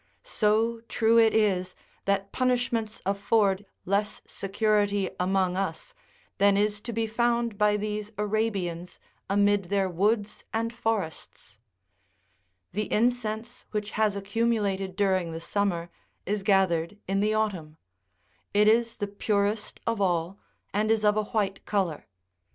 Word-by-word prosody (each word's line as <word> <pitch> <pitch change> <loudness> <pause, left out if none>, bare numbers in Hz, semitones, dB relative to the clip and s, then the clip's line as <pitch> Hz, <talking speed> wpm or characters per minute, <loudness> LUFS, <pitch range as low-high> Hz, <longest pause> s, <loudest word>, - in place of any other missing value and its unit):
So 225 - +1
true 230 0 +4
it 225 -1 +6
is 190 -4 +1 0.3
that 200 0 0
punishments 245 -3 0
afford 200 0 +1 0.2
less 205 +3 0
security 205 -1 0
among 185 0 +1
us 185 -4 -3 0.5
than 200 0 +5
is 210 0 +1
to 235 - -5
be 225 0 -1
found 235 0 0
by 210 0 +3
these 210 0 -3
Arabians 200 -5 -2 0.3
amid 205 0 +3
their 195 +1 +1
woods 205 +4 0
and 230 +1 -1
forests! 185 - -4 1.1
The 210 +2 -3
incense 235 0 -1
which 210 -1 -3
has 215 -2 +1
accumulated 200 -2 -1
during 190 -4 +1
the 165 - -4
summer 175 -2 -1 0.3
is 205 +1 -1
gathered 190 -2 +2
in 195 +1 +1
the 215 +1 +2
autumn: 180 -8 -2 0.8
it 210 +1 +5
is 230 +1 +3
the 205 - -3
purest 205 +1 -1
of 230 -3 -1
all, 175 0 0 0.3
and 210 +2 +1
is 220 -1 +2
of 210 0 +4
a 215 0 0
white 200 -2 -1
colour. 190 -7 -1
205 Hz, 130 wpm, -27 LUFS, 195-220 Hz, 1.1 s, it